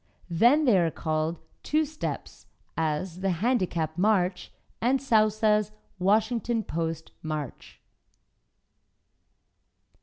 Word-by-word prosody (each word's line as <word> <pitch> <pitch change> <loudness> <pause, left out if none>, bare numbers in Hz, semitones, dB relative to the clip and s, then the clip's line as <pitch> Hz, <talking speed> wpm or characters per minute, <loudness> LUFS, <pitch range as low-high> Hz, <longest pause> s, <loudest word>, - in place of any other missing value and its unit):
Then 245 - +4
they 220 -8 +5
are 170 -2 +2
called 155 +1 -2 0.2
Two 310 +1 +1
Steps, 310 +1 -6 0.3
as 165 +3 -2
"The 195 0 0
Handicap 175 -5 0
March," 185 -3 +1 0.3
and 255 +3 +2
Sousa's 215 -4 +2 0.3
"Washington 220 +4 +1
Post" 165 -2 -4
March. 155 -4 -6
195 Hz, 90 wpm, -27 LUFS, 165-230 Hz, 0.3 s, they